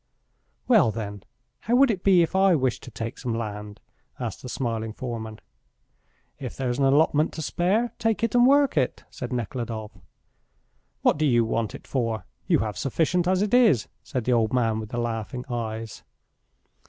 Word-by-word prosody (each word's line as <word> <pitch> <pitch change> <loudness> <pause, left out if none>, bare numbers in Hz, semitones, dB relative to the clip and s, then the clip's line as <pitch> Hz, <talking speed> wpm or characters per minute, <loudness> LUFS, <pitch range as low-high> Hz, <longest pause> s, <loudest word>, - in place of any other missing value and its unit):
"Well, 215 - +5
then, 105 -2 -5 0.4
how 235 - 0
would 265 -1 +5
it 190 -4 -4
be 185 -3 +6
if 165 - -3
I 190 -2 +5
wished 130 -4 0
to 130 - -10
take 115 0 -6
some 120 -3 -2
land?" 105 -2 -6 0.4
asked - - -4
the 125 - -7
smiling 115 -3 -3
foreman. 110 -3 -6 1.0
"If 130 -4 -6
there 130 -2 -1
is 120 - -3
an 135 - +3
allotment 150 +2 +3
to 160 - -5
spare, 210 +10 0
take 225 0 0
it 230 - +1
and 245 0 +6
work 280 - +4
it," 130 -3 0
said 125 - -6
Nekhludoff. 115 -2 -4 1.1
"What - - +3
do 155 - +3
you 120 -3 +3
want 115 -1 -2
it - - -11
for? 115 -4 -2 0.2
You 175 -3 +4
have 105 -4 -5
sufficient 170 +6 +1
as 185 +1 +2
it 210 - -2
is," 225 - +4
said 125 - -4
the 125 - +1
old 115 -1 +2
man 115 -3 +1
with 110 -1 -6
the 120 - -5
laughing 120 +1 -3
eyes. 115 -3 -4
125 Hz, 180 wpm, -25 LUFS, 115-175 Hz, 1.1 s, be